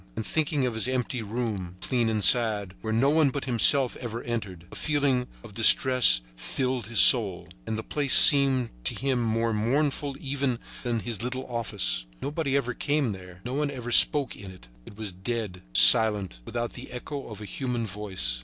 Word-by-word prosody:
And, 110 Hz, -, -6 dB
thinking 150 Hz, -3 st, -2 dB
of 125 Hz, -, -3 dB
his 110 Hz, +2 st, -3 dB
empty 125 Hz, -1 st, -3 dB
room, 105 Hz, -5 st, -6 dB
clean 120 Hz, -1 st, -2 dB
and 110 Hz, -2 st, -2 dB
sad, 105 Hz, -4 st, +3 dB
where 110 Hz, -, -5 dB
no 125 Hz, +6 st, +1 dB
one 155 Hz, -2 st, +2 dB
but 135 Hz, +1 st, -6 dB
himself 130 Hz, +1 st, +4 dB
ever 120 Hz, -1 st, -7 dB
entered, 100 Hz, -8 st, -6 dB
a -, -, -11 dB
feeling 140 Hz, -4 st, -1 dB, 0.2 s
of 115 Hz, -4 st, -13 dB
distress 120 Hz, -, +4 dB
filled 125 Hz, -, -4 dB
his 115 Hz, -1 st, 0 dB
soul; 105 Hz, -8 st, +5 dB, 0.2 s
and 110 Hz, -, -4 dB
the 110 Hz, -, -6 dB
place 145 Hz, +1 st, 0 dB
seemed 135 Hz, -5 st, +5 dB
to -, -, -3 dB
him 135 Hz, -2 st, -2 dB
more 115 Hz, 0 st, -2 dB
mournful 140 Hz, +5 st, -2 dB
even 135 Hz, -3 st, -3 dB, 0.2 s
than 120 Hz, -3 st, -3 dB
his 115 Hz, -3 st, -5 dB
little 130 Hz, +2 st, -5 dB
office. 80 Hz, -, -4 dB
Nobody 145 Hz, -2 st, -3 dB
ever 125 Hz, -3 st, -3 dB
came 145 Hz, -2 st, -2 dB
there; 90 Hz, -2 st, -12 dB
no 125 Hz, -, -6 dB
one 145 Hz, +1 st, -2 dB
ever 125 Hz, -3 st, -8 dB
spoke 140 Hz, +3 st, +3 dB
in 100 Hz, -, -12 dB
it. 90 Hz, -10 st, -16 dB, 0.2 s
It 100 Hz, -, -14 dB
was 110 Hz, -3 st, -7 dB
dead, 95 Hz, 0 st, -6 dB
silent, 95 Hz, -, +6 dB
without 120 Hz, 0 st, -5 dB
the 125 Hz, -, -10 dB
echo 140 Hz, +3 st, -8 dB
of 110 Hz, -2 st, -10 dB
a 105 Hz, -, -9 dB
human 125 Hz, 0 st, -5 dB
voice. 95 Hz, -, -5 dB
120 Hz, 185 wpm, -25 LUFS, 105-130 Hz, 0.2 s, silent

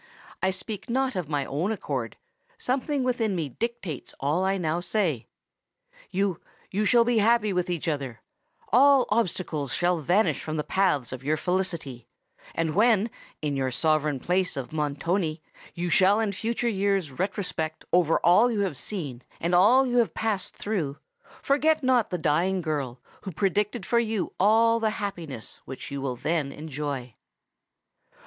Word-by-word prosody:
"I 190 Hz, -, +2 dB
speak 200 Hz, +3 st, -5 dB
not 265 Hz, +2 st, 0 dB
of 175 Hz, -5 st, -3 dB
my 145 Hz, -3 st, 0 dB
own 160 Hz, +11 st, -1 dB
accord—something 245 Hz, -, -3 dB
within 235 Hz, -5 st, 0 dB
me 160 Hz, -5 st, -2 dB
dictates 215 Hz, -, -5 dB
all 150 Hz, +7 st, +1 dB
I 195 Hz, +1 st, +1 dB
now 165 Hz, -2 st, -1 dB
say! 175 Hz, -, -1 dB, 0.8 s
Yes—you 195 Hz, +2 st, -3 dB
shall 235 Hz, +1 st, +5 dB
be 235 Hz, -1 st, +2 dB
happy 215 Hz, -1 st, +3 dB
with 180 Hz, -1 st, 0 dB
each 175 Hz, -2 st, -2 dB
other; 140 Hz, -7 st, -2 dB, 0.5 s
all 275 Hz, +1 st, +6 dB
obstacles 175 Hz, -, -1 dB
shall 175 Hz, -1 st, +1 dB
vanish 180 Hz, +8 st, +2 dB
from 155 Hz, 0 st, -4 dB
the 150 Hz, -, 0 dB
paths 165 Hz, -, +1 dB
of 130 Hz, 0 st, -7 dB
your 155 Hz, +3 st, +1 dB
felicity; 160 Hz, -10 st, -2 dB, 0.5 s
and 160 Hz, -2 st, 0 dB
when, 220 Hz, +2 st, +3 dB, 0.3 s
in 145 Hz, -2 st, 0 dB
your 135 Hz, -1 st, 0 dB
sovereign 150 Hz, +1 st, +1 dB
palace 180 Hz, +2 st, 0 dB
of 135 Hz, +2 st, -5 dB
Montoni, 155 Hz, +2 st, -1 dB, 0.3 s
you 175 Hz, 0 st, -2 dB
shall 195 Hz, +6 st, +5 dB
in 220 Hz, -2 st, +1 dB
future 230 Hz, +4 st, -2 dB
years 195 Hz, -6 st, +1 dB
retrospect 180 Hz, -5 st, -2 dB
over 170 Hz, -2 st, +4 dB
all 195 Hz, +8 st, +5 dB
you 215 Hz, -3 st, 0 dB
have 185 Hz, -9 st, -1 dB
seen 145 Hz, -, -4 dB, 0.2 s
and 170 Hz, +2 st, -1 dB
all 225 Hz, +9 st, +6 dB
you 245 Hz, -1 st, 0 dB
have 235 Hz, -2 st, +2 dB
passed 210 Hz, -4 st, -2 dB
through, 165 Hz, -10 st, -2 dB, 0.5 s
forget 310 Hz, +2 st, +2 dB
not 255 Hz, -3 st, +3 dB
the 180 Hz, -, -2 dB
dying 175 Hz, +4 st, +1 dB
girl 140 Hz, -6 st, -2 dB, 0.2 s
who 190 Hz, -, -6 dB
predicted 205 Hz, +6 st, 0 dB
for 235 Hz, -, +3 dB
you 220 Hz, -4 st, -1 dB
all 230 Hz, +3 st, +4 dB
the 220 Hz, -1 st, +1 dB
happiness 165 Hz, -, -6 dB
which 135 Hz, +2 st, -8 dB
you 140 Hz, -1 st, -4 dB
will 130 Hz, -2 st, -2 dB
then 150 Hz, +1 st, -1 dB
enjoy!" 145 Hz, -5 st, -5 dB
180 Hz, 155 wpm, -26 LUFS, 150-215 Hz, 0.8 s, all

